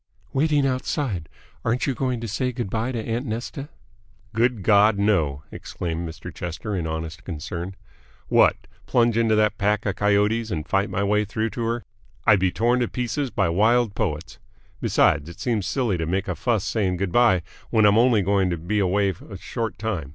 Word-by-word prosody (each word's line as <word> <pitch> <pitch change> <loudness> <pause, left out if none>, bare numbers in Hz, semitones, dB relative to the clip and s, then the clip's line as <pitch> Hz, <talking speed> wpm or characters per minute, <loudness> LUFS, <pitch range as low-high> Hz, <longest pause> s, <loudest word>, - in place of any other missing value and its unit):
"Waiting 145 0 +2
outside. 130 - -2 0.3
Aren't 115 +2 0
you 135 - 0
going 125 -1 -2
to 115 - -4
say 125 +5 -1
good 120 -6 -4
bye 115 +3 -1
to 125 - -3
aunt 115 +4 -3
Nesta?" 120 +6 -5 0.6
"Good 115 -2 +1
God, 105 0 +5
no!" 80 -9 +1
exclaimed 85 -1 -4
Mr. 80 - -9
Chester 90 +5 -4
in 85 -3 -2
honest 80 +1 -5
concern. 90 +3 -5 0.5
"What! - - +5 0.3
Plunge 120 -2 +3
into 115 -1 +3
that 105 -1 +2
pack 105 +1 +1
of 100 -1 -1
coyotes 105 +2 +2
and 80 -6 -3
fight 100 +1 +1
my 100 - -1
way 105 +1 +2
through 110 +2 -2
to 120 - -5
her! 115 +1 -1 0.4
I'd 100 - +6
be 95 0 +2
torn 120 +5 +2
to 120 - +1
pieces 125 +4 -2
by 85 - +1
wild 110 +5 +3
poets. 75 -4 -3 0.4
Besides, 75 +2 +2
it 85 - -12
seems 110 -6 -1
silly 115 -10 0
to 80 - -2
make 95 +5 -1
a - - -1
fuss 115 -6 0
saying 95 -5 0
good 95 0 -2
bye 115 -7 +4 0.3
when 110 -2 +4
I'm 105 +2 +5
only 120 -4 +4
going 95 -1 +2
to 85 - -1
be 90 +7 -1
away 100 +1 +2 0.2
a 100 - -7
short 115 +4 -4
time. 95 -11 -3
105 Hz, 190 wpm, -24 LUFS, 95-115 Hz, 0.6 s, I'd